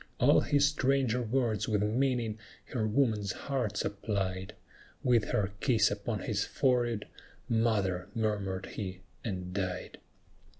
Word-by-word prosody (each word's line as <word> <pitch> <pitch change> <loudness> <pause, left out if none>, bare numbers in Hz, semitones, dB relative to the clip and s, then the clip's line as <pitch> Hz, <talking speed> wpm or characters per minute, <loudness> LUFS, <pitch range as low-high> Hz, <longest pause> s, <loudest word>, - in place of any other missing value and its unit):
All - - +6
his 145 -1 +3
stranger 135 -4 +2
words 115 -3 0
with 105 -2 +2
meaning 115 -1 0 0.3
her 110 -4 +1
woman's 110 -4 +1
heart 125 -7 -2
supplied; 100 -1 -2 0.5
With 120 -4 +4
her 100 -1 0
kiss 115 -6 +3
upon 105 +1 -2
his 105 -3 0
forehead, 120 -5 +1 0.4
"Mother!" 105 -6 +1
murmured 100 -4 -1
he, 95 -3 -6 0.2
and 90 -4 -4
died! 95 -2 -3
110 Hz, 120 wpm, -31 LUFS, 100-120 Hz, 0.5 s, All